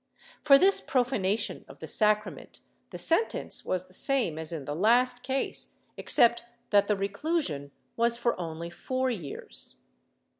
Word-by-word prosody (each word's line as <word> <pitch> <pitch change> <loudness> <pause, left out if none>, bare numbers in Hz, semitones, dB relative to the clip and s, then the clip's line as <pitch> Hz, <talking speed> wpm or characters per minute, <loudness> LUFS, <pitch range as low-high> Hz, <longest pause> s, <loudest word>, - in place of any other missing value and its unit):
For 275 -2 +7
this 385 +5 +4
profanation 230 -5 0
of - - -13
the - - -8
sacrament 210 -1 -1 0.3
the - - -8
sentence 420 +8 0
was 185 0 -2
the 185 - -16
same 230 - +1
as 160 0 -5
in 155 -5 -5
the 145 - -4
last 245 +7 +3
case, 265 +1 -3 0.3
except 235 0 +3 0.3
that 200 -1 +4
the 210 - +1
reclusion 200 - -2 0.3
was 235 0 +1
for 235 0 0
only 165 0 -6
four 255 +8 -2
years. 170 - -6
220 Hz, 145 wpm, -28 LUFS, 180-255 Hz, 0.3 s, For